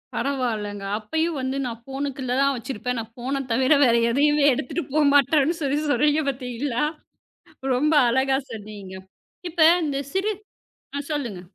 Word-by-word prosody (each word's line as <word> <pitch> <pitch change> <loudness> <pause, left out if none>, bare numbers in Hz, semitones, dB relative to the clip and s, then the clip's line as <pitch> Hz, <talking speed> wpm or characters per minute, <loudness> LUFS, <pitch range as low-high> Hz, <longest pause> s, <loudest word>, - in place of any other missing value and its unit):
பரவாயில்லங்க. 220 -7 -2
அப்பயும் 320 +8 -2
வந்து 260 +1 -2
நான் 235 -1 -6
ஃபோன்க்குள்ள 270 -1 -4
தான் 275 0 +3
வச்சிருப்பேன். 250 +1 -4
நான் 225 0 -7
ஃபோன் 260 +3 -3
தவிர 260 +5 +3
வேற 235 -1 +4 0.2
எதையுமே 295 +2 +3
எடுத்துட்டு 290 +8 -3
போமாட்டேன்னு 290 +1 +4
சொல்லிச் 290 +2 0
சொல்றீங்க 295 +4 +3
பாத்தீங்களா? 250 0 -3 0.9
ரொம்ப 300 +5 +2 0.2
அழகா 265 +2 +2
சொன்னீங்க. 205 -3 -9 0.6
இப்ப 320 -1 +5 0.2
இந்தச் 280 -2 -3
சிறு 390 +3 +1 0.7
அ - - 0
சொல்லுங்க. 235 -11 -3
270 Hz, 130 wpm, -24 LUFS, 235-290 Hz, 0.9 s, இப்ப